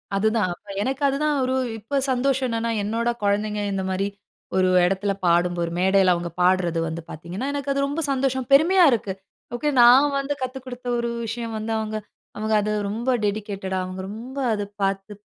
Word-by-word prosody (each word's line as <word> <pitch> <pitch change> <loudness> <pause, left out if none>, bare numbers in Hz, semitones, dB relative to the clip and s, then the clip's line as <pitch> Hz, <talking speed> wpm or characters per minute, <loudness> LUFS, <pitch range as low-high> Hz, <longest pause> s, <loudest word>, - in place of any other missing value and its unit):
அதுதான் 215 0 +2
அப்ப 205 +4 -19
எனக்கு 265 +5 -2
அதுதான். 295 +2 +1
ஒரு 260 +1 0 0.2
இப்போ 230 +6 -5 0.2
சந்தோஷம் 260 +1 +1
என்னன்னா, 230 0 -1
என்னோட 230 +3 -1
குழந்தைங்க, 210 +1 0
இந்த 190 -1 -2
மாரி 190 +1 0 0.5
ஒரு 185 0 +3 0.2
இடத்தில 195 +2 0
பாடும்போது 175 0 +2
ஒரு 170 - -5
மேடைல 190 0 +4
அவங்க 170 0 -4
பாடுறது 180 -2 +2
வந்து 165 +1 -4
பார்த்தீங்கன்னா, 175 - -5
எனக்கு 285 -1 -2
அது 275 0 +1
ரொம்ப 290 +4 -2
சந்தோஷம். 265 -1 0
பெருமையா 345 +6 +6
இருக்கு. 210 -5 -1 0.4
ஓகே, 295 +5 0
நான் 265 +4 +7
வந்து 275 +1 -2
கத்து 255 +1 -3
குடுத்த 250 -1 -8
ஒரு 235 - -1 0.2
விஷயம் 230 0 -4
வந்து, 220 +1 -4
அவங்க 215 0 -3 0.4
அவங்க 215 +1 -1
அதை 210 +1 -1 0.2
ரொம்ப 230 +5 -3
டெடிகேட்டடா, 200 -2 -2
அவங்க 185 +1 -6
ரொம்ப 240 +6 -8 0.2
அதை 205 -1 -2 0.2
பார்த்து 195 +1 -1
215 Hz, 175 wpm, -23 LUFS, 195-255 Hz, 0.5 s, நான்